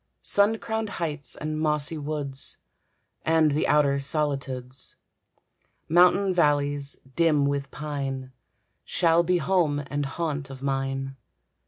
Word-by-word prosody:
Sun 205 +2 +3
crowned 220 -1 -3
heights 150 -6 -3
and 155 0 -3
mossy 150 0 +2
woods, 145 -3 -4 0.7
And 160 -1 +3
the 145 - +1
outer 145 -2 +3
solitudes, 135 -3 -3 0.9
Mountain 180 +3 +5
valleys, 145 -4 +1 0.2
dim 155 -4 +3
with 140 -1 -1
pine, 135 -3 -4 0.5
Shall 170 -1 +3
be 180 +1 +2
home 160 -4 +1
and 145 -1 -1
haunt 145 -2 -3
of 135 0 -9
mine. 135 0 -2
145 Hz, 115 wpm, -26 LUFS, 140-165 Hz, 0.9 s, Mountain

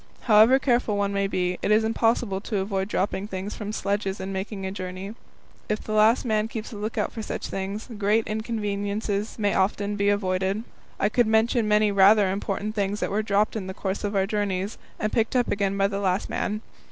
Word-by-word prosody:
However 225 +3 +6
careful 240 -5 +1
one 200 0 0
may 200 0 +1
be, 180 -2 -1
it - - -1
is 215 +1 +4
impossible 225 -3 +1
to 210 0 -3
avoid 195 0 -1
dropping 200 0 -1
things 190 +1 -5
from 210 -1 -5
sledges 200 -1 -2
in 190 +1 -4
making 195 +1 -4
a 190 - -3
journey. 185 +1 -6 0.6
If 215 0 -1
the - - -6
last 215 +4 +4
man 215 -2 +1
keeps 225 -1 -6
a - - -8
lookout 210 +2 -2
for 225 - -6
such - - -4
things, 195 +3 -4
great 215 +2 +2
inconvenience 210 -1 -2
may 205 -3 +1
often 200 +1 0
be 200 0 +2
avoided. 190 +1 0 0.4
I 200 - +3
could 240 +1 +2
mention 220 +1 +2
many 210 0 +3
rather 200 0 +5
important 200 +2 -3
things 205 -1 -1
that - - -2
were 210 +2 +1
dropped 210 0 +1
in 200 -4 -4
the 190 - -6
course 195 0 -3
of 205 0 -2
our 190 -1 +3
journeys 200 -1 -2 0.2
and 215 - -1
picked 225 +2 +1
up 245 -1 +2
again 200 -1 0
by 195 - +3
the 200 0 -3
last 190 -1 0
man. 210 +1 -2
205 Hz, 205 wpm, -25 LUFS, 195-215 Hz, 0.6 s, However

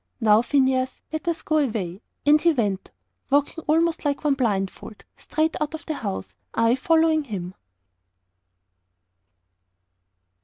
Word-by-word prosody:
"Now, 215 -2 +5
Phineas, 260 0 +1
let 315 +2 -4
us 335 -1 -1
go 310 0 +2
away." 210 - -2 0.2
And 300 +1 +5
he 340 -1 +4
went, 205 -8 -1 0.4
walking 290 +3 +1
almost 325 +2 +2
like 285 -1 -1
one 295 -2 +3
blindfold, 210 -4 -2
straight 315 +1 -1
out 305 +1 -1
of 315 - -10
the 315 - -2
house, 200 -9 -5 0.2
I 230 +1 +3
following 320 +2 +2
him. 185 -6 -5
275 Hz, 125 wpm, -24 LUFS, 220-310 Hz, 0.4 s, Now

